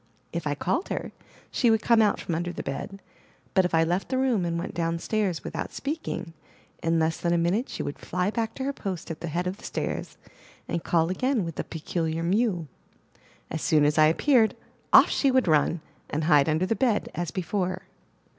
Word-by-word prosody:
If 170 -2 -2
I 145 - 0
called 190 - -1
her, - - -3 0.4
she 240 - +3
would 220 -1 +3
come 230 -2 +5
out 210 - +3
from 170 - -3
under 175 +2 -1
the 175 - -6
bed; 195 +8 -5 0.5
but 190 -2 +4
if 175 - 0
I 165 - +5
left 175 +4 -1
the 260 - 0
room, 250 -8 +2
and 170 0 -1
went 170 - -4
down 165 0 -1
stairs 190 -2 -1
without - - -4
speaking, 280 - -4 0.5
in 165 0 +1
less 160 0 +1
than 170 0 +1
a - - +3
minute 180 +9 +1
she - - -4
would 145 - -5
fly 180 +3 -1
back 225 0 -2
to 265 - -4
her 280 +1 -1
post 185 -9 -5
at 160 - -7
the 170 - -3
head 170 +3 -2
of 185 +2 -3
the - - -17
stairs, - - -4 0.5
and 170 - -2
call 165 0 +2
again 255 0 0
with 165 - -4
the - - -3
peculiar 165 0 -3
mew. 185 -2 +1 0.8
As 160 - -3
soon 150 -2 +3
as 150 +1 +2
I 155 - +7
appeared, 225 - +3 0.4
off - - +8
she 275 - +2
would 260 -5 +3
run, 155 +1 +3 0.3
and 155 +2 -1
hide 150 -2 +4
under 160 +4 +2
the 225 - 0
bed 235 -5 +1
as 175 -2 -2
before. 185 +1 -2
175 Hz, 210 wpm, -26 LUFS, 165-215 Hz, 0.8 s, off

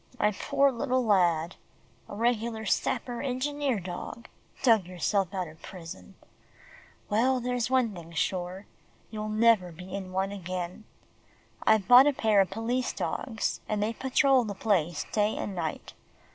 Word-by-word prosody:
"My 210 - +3
poor 275 +7 +2
little 255 0 0
lad 175 -5 +2 0.5
a - - -7
regular 230 0 -1
sapper, 240 +3 -1
engineer 275 -1 -1
dog 180 +5 -7 0.3
dug 225 -8 +4
yourself 185 +1 0
out 185 -3 -3
of 155 +1 -14
prison. 165 - -10 0.9
Well, 250 +5 +2
there's 245 -1 -1
one 255 -4 +2
thing 170 -2 -10
sure. 185 +3 -2 0.5
You'll 215 -1 -4
never 215 -4 +3
be 180 +3 -11
in 190 -2 -5
one 190 +1 -1
again. 185 +1 -5 0.8
I've 215 -3 +4
bought 250 +3 +9
a 290 - +3
pair 215 -5 +3
of 190 - 0
police 230 +5 -2
dogs, 225 -4 -2
and 210 -1 0
they 220 +2 -1
patrol 265 +1 +3
the 205 -3 -5
place 180 -6 0
day 210 0 +1
and 200 - -4
night. 165 -4 -4
210 Hz, 145 wpm, -28 LUFS, 185-240 Hz, 0.9 s, bought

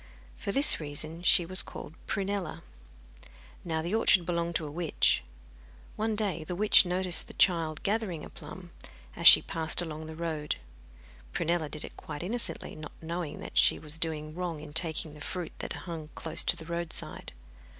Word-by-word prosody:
For 200 - -4
this 275 +7 +6
reason 155 +2 -4
she 180 0 +4
was 185 +2 +2
called 155 - -9
Prunella. 195 -4 -3 1.0
Now, 160 -2 -2
the 175 +4 -3
orchard 195 -5 +4
belonged 170 -1 -1
to 160 - 0
a 145 - -6
witch. 160 - +2 0.7
One 220 0 -1
day 200 -6 -2
the 175 +3 -5
witch 205 -1 +6
noticed 180 0 0
the - - -11
child 165 -4 +2
gathering 200 -6 -1
a - - -11
plum, 170 +3 -11 0.4
as 170 - +4
she - - +10
passed 160 -1 -1
along 160 -2 -3
the 160 - -8
road. 155 -2 -2 0.8
Prunella 165 -2 0
did 150 - -4
it - - -12
quite 150 +1 -7
innocently, 235 +6 -3
not 155 -1 -9
knowing 165 -1 -5
that - - 0
she - - +5
was 155 +1 -5
doing 155 -2 -2
wrong 175 -2 -4
in 150 0 -10
taking 160 -1 +2
the 150 - -13
fruit 175 +1 -5
that - - -4
hung 160 -3 -6
close 160 - +2
to - - +4
the 165 -2 -8
roadside. 170 0 -2
170 Hz, 175 wpm, -29 LUFS, 155-180 Hz, 1.0 s, she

